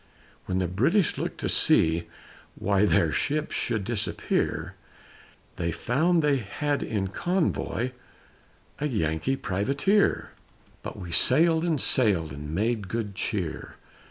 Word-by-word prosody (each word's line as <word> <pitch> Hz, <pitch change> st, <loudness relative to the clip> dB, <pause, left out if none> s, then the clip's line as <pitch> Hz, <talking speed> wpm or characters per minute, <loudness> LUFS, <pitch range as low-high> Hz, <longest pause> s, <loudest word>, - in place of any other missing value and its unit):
When 95 Hz, -, -1 dB
the 95 Hz, -1 st, 0 dB
British 135 Hz, -, +1 dB
looked -, -, -4 dB
to -, -, -1 dB
see 80 Hz, +1 st, +4 dB, 0.5 s
Why 100 Hz, +1 st, +1 dB
their 80 Hz, -3 st, +2 dB
ships 150 Hz, -, -1 dB
should 110 Hz, -3 st, -1 dB
disappear, 110 Hz, 0 st, -2 dB, 0.8 s
They 85 Hz, -1 st, -1 dB
found 160 Hz, -, +1 dB
they 145 Hz, -2 st, +3 dB
had 140 Hz, +6 st, -3 dB
in 100 Hz, -3 st, -2 dB
convoy 160 Hz, -, -1 dB, 0.9 s
A 150 Hz, -, -1 dB
Yankee 95 Hz, -, -1 dB
Privateer. 140 Hz, -, 0 dB, 0.5 s
But -, -, -8 dB
we 90 Hz, -4 st, -8 dB
sailed 160 Hz, -, +5 dB
and 165 Hz, -4 st, 0 dB
sailed 95 Hz, -, +2 dB
And 75 Hz, +1 st, -8 dB
made 105 Hz, +4 st, -1 dB
good 105 Hz, 0 st, -4 dB
cheer! 95 Hz, -5 st, -4 dB
110 Hz, 125 wpm, -26 LUFS, 90-145 Hz, 0.9 s, sailed